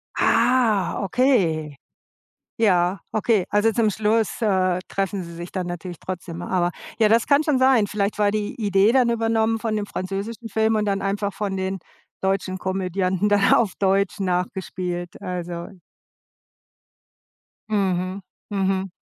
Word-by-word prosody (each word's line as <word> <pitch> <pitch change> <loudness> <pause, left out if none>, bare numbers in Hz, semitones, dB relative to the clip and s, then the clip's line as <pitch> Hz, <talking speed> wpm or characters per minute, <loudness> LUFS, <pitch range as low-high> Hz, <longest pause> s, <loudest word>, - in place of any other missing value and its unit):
Ah, 235 -5 +2
okay! 185 - +1 0.8
Ja, 185 -4 +3
okay. 220 -3 +2
Also 210 +2 +2
zum 225 -1 +2
Schluss, 215 +1 0
äh, 185 -4 +2
treffen 195 0 -2
Sie 170 0 -9
sich 170 +1 -8
dann 185 -2 -3
natürlich 175 -1 -6
trotzdem. 175 -2 -6
Aber 175 -1 0 0.3
ja, 220 -2 +4
das 225 +1 +4
kann 290 +2 +4
schon 295 -4 +1
sein. 260 -5 +4
Vielleicht 200 0 -1
war 205 -1 +3
die 210 -1 -2
Idee 205 0 +3
dann 255 -3 +4
übernommen 225 -1 +1
von 220 -1 -2
dem 210 -1 -1
französischen 200 +5 -5
Film 220 +1 +1
und 210 -1 +1
dann 195 -1 0
einfach 200 0 -1
von 195 -1 -3
den 190 0 -2 0.4
deutschen 190 -1 -1
Komödianten 190 +1 -1
dann 205 -1 +4
auf 215 -5 +3
Deutsch 195 +1 +1
nachgespielt, 180 -1 -3
also. 175 -1 -5 2.0
Mhm. 190 -2 0 0.3
Mhm. 195 -1 0
195 Hz, 140 wpm, -23 LUFS, 185-220 Hz, 2.0 s, ja